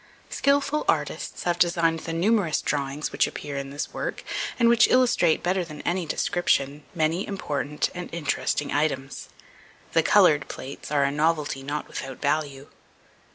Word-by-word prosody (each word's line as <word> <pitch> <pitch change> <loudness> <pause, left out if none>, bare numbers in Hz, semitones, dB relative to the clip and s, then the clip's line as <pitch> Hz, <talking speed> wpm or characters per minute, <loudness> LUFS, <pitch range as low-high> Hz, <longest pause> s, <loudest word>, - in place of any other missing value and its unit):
Skilful 285 +2 +1
artists - - -1
have 175 0 0
designed 170 -2 +2
the 165 - -6
numerous 180 -1 +2
drawings 140 +1 -2
which - - +2
appear 145 -1 -6
in 140 0 -4
this 145 +2 -5
work, - - -4 0.3
and 235 - +4
which 235 +1 +6
illustrate, 245 -10 +3
better 185 +1 +1
than 155 -3 -9
any 175 -1 -1
description, 145 -4 0
many 165 +4 0
important 150 -6 -2
and 180 0 -7
interesting 150 -2 -1
items. 140 -2 -2 0.6
The 165 - +5
coloured 155 -6 +4
plates 135 +2 -8
are 145 -2 +3
a 140 - +1
novelty 150 -2 0
not 145 +2 -4
without 135 -1 -6
value. 145 -2 -1
155 Hz, 150 wpm, -25 LUFS, 145-175 Hz, 0.6 s, which